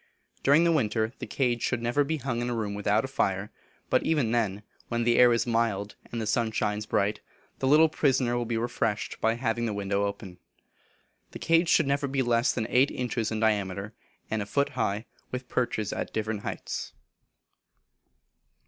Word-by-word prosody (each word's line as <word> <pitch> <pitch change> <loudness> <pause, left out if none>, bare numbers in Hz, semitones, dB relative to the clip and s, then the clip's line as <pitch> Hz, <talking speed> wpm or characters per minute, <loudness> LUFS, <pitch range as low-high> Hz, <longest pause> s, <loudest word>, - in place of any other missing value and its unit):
During 145 +4 +5
the 170 - +4
winter, 110 -6 +1
the - - -5
cage 120 -3 0
should 120 - 0
never 120 +5 +2
be 160 +3 -2
hung 125 -3 -2
in 120 - -2
a 120 - -1
room 105 -3 -2
without 105 +3 +1
a - - -4
fire, 100 -6 -1 0.4
but - - +3
even 145 -8 +1
then, 105 -4 0 0.2
when 120 0 -1
the 120 0 +3
air 125 -1 +7
is 115 - +2
mild, 115 -4 0 0.2
and 115 - -3
the 110 - -2
sun 110 +1 +1
shines 105 -1 -1
bright, 105 +1 +1 0.4
the 135 - 0
little 155 +4 +6
prisoner 130 -5 +1
will 120 -1 -1
be 115 -1 -1
refreshed 115 -2 -2
by 115 +1 +2
having 120 -1 -1
the 105 - -2
window 100 0 0
open. 100 -3 -6 0.9
The - - -5
cage 165 +1 +2
should 160 - +4
never 140 +1 0
be 135 0 0
less 120 +1 +2
than 110 - -2
eight 130 +3 +4
inches 120 -3 -2
in 110 - -2
diameter, 100 -1 0 0.4
and 110 -1 0
a 100 - -5
foot 140 +6 +1
high, 105 +3 -2 0.2
with 125 0 -5
perches 110 -4 -1
at - - -4
different 110 -1 -2
heights. - - -5
115 Hz, 190 wpm, -27 LUFS, 105-130 Hz, 0.9 s, air